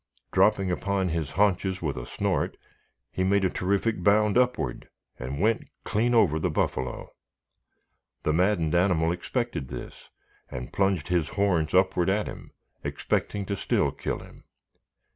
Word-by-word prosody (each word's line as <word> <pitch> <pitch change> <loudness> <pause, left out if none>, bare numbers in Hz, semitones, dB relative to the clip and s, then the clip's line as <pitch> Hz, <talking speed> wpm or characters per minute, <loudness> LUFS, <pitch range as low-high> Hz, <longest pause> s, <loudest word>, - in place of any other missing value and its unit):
Dropping 95 -2 +3
upon 95 0 0
his 80 -3 -2
haunches 95 -2 +2
with 75 -6 -2
a - - -6
snort, - - -1 0.5
he 95 - -1
made 100 +1 +3
a 95 - +1
terrific 100 +2 0
bound 105 +2 +4
upward 125 - 0 0.3
and 65 +3 -4
went 110 +3 +1
clean 115 +3 +1
over 85 -9 +4
the 90 - 0
buffalo. 65 -5 -2 1.1
The 75 - +1
maddened 85 -2 +2
animal 85 -2 +3
expected 85 -6 -3
this, - - -9 0.4
and 60 0 -7
plunged 95 -5 +1
his 85 -3 +1
horns 90 -5 +1
upward 95 -1 +3
at 105 +2 +1
him, - - -8 0.3
expecting 100 -1 -2
to 100 - -2
still - - +1
kill - - -3
him. - - -15
95 Hz, 145 wpm, -27 LUFS, 80-100 Hz, 1.1 s, bound